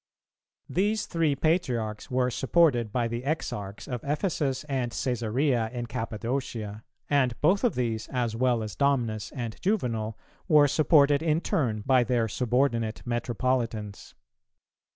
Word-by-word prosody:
These 210 +3 0
three 160 -4 +1
Patriarchs 125 - -1
were 125 0 +1
supported 130 -5 +2
by 120 +1 0
the 115 +1 -3
Exarchs 105 -9 -4
of 125 -3 -4
Ephesus 145 -3 -1
and 130 -5 -2
Cæsarea 120 0 0
in 120 -1 -4
Cappadocia; 115 -2 -4 0.2
and 130 -5 +1
both 190 +8 +3
of 245 - +2
these 115 -3 -2
as 120 -3 -1
well 120 -1 +1
as 110 - -6
Domnus 120 -7 0
and 120 -3 -5
Juvenal, 115 - -1 0.3
were 150 -4 +6
supported 145 -1 +4
in 160 -1 +2
turn 130 - -1
by 130 -2 +4
their 120 -1 +1
subordinate 120 -1 0
Metropolitans. 120 -3 -2
125 Hz, 130 wpm, -27 LUFS, 115-145 Hz, 0.3 s, were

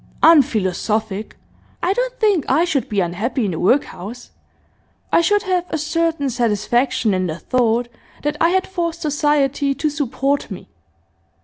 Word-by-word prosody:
'Unphilosophic. 220 - +2 0.5
I 365 - +2
don't - - -2
think 410 - +3
I 310 +6 +3
should 285 -7 -1
be 205 -2 +1
unhappy 210 +8 -1
in 195 - -1
the 160 - -4
workhouse. 240 0 -1 0.8
I - - +5
should 415 +5 +2
have 365 -3 0
a 320 - -1
certain 320 -2 -1
satisfaction 235 0 +1
in 185 -1 0
the 160 -1 -4
thought 240 +1 +1 0.4
that 295 +1 -1
I 335 - +5
had 375 +1 +1
forced 340 -3 -3
society 285 -2 +1
to 305 +3 0
support 280 -1 -1
me. - - -9
275 Hz, 145 wpm, -19 LUFS, 220-330 Hz, 0.8 s, I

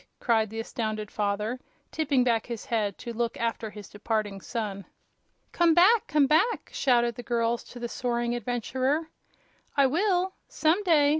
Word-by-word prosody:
cried 220 -3 +2
the 225 +1 -6
astounded 215 -2 -3
father, 210 +4 -1 0.3
tipping 285 -5 +2
back 230 -3 +1
his 235 -3 -5
head 210 -4 -1
to 235 -1 -6
look 235 0 -2
after 230 -1 -2
his 210 -2 -10
departing 205 -2 -3
son. 205 -4 -4 0.7
"Come 340 -2 +3
back! 405 +6 +5
Come 295 -2 +3
back!" 320 - +2
shouted 240 -3 +2
the 245 - -8
girls 235 -1 0
to 245 - -11
the 240 - -3
soaring 240 0 -1
adventurer. 260 +6 -1 0.7
"I 280 - +6
will 370 +5 +1
some 325 +5 +2
day!" 315 -7 +4
240 Hz, 155 wpm, -27 LUFS, 220-290 Hz, 0.7 s, I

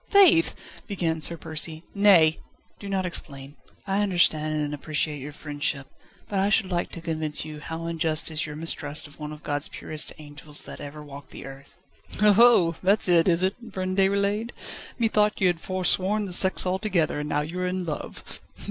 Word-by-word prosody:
"Faith! 360 -5 +6 0.2
" - - -19
began 165 -6 -2
Sir 170 +2 0
Percy. 160 0 -4
"Nay! 185 -6 +5 0.4
do 200 - -8
not 190 -1 -1
explain. 140 -5 -4 0.3
I 195 0 0
understand 155 -6 +2
and 145 - -5
appreciate 150 0 -3
your 145 +3 -7
friendship, 145 -2 -3 0.4
but 200 - -2
I 195 +1 +2
should 205 -3 +2
like 175 -1 -1
to 170 - -7
convince 155 -2 -2
you 155 -1 -8
how 160 +2 -6
unjust 160 -1 0
is 155 +1 -2
your 150 - -7
mistrust 150 -1 -3
of 145 0 -15
one 150 0 -6
of 150 0 -10
God's 145 0 0
purest 155 -1 -1
angels, 150 0 -3
that - - -9
ever 150 +1 -8
walked 140 -1 -11
the - - -10
earth." 135 +6 -13 0.4
"Oho! 210 -5 +5
that's 195 +3 +4
it, 170 -1 +5
is 175 0 +3
it, 190 +2 +1 0.2
friend 185 0 -3
Déroulède? 200 +3 +1 0.5
Methought 210 -2 +2
you 190 - +2
had 175 -2 +1
foresworn 190 +3 +1
the 185 - -6
sex 190 +1 +3
altogether, 185 -5 0
and 150 0 -4
now 150 - 0
you 165 +5 -5
are 180 - -1
in 180 0 -3
love." 155 -3 -7
165 Hz, 185 wpm, -25 LUFS, 150-190 Hz, 0.5 s, Faith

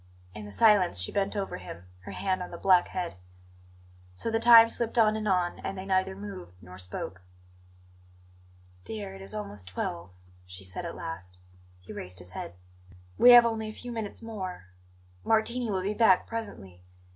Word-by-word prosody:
In 105 0 -8
the 105 - -9
silence 205 - +4
she 90 - -2
bent 200 +1 -1
over 200 -1 -3
him, 90 -1 -10 0.2
her - - -7
hand 185 -1 -1
on 180 - -5
the 170 - -8
black 185 -1 +4
head. 180 - -4 1.0
So 225 - -2
the 225 - +1
time 230 -1 +9
slipped 235 0 -3
on 215 -2 +5
and 215 -1 -3
on; 180 -3 +1
and 195 - -5
they 190 - -6
neither 190 0 0
moved 195 - -9
nor 90 0 -13
spoke. 95 0 -6 1.6
"Dear, 100 -2 -6
it 95 - -11
is 95 +2 -7
almost 100 -2 -6
twelve," 90 -1 -4 0.4
she 90 +1 -11
said 90 -1 -6
at - - -7
last. 90 +2 -7 0.4
He 90 - -10
raised 90 0 -8
his 90 0 -11
head. 85 - -7 0.6
"We 245 - +8
have 240 -1 +10
only 220 -1 -1
a 215 - -7
few 245 +2 -8
minutes 225 -1 -5
more; 190 - -6 0.5
Martini 230 +2 +1
will 190 -2 -1
be 200 +2 -1
back 210 -5 +4
presently. 100 - -7
185 Hz, 180 wpm, -28 LUFS, -, 1.6 s, have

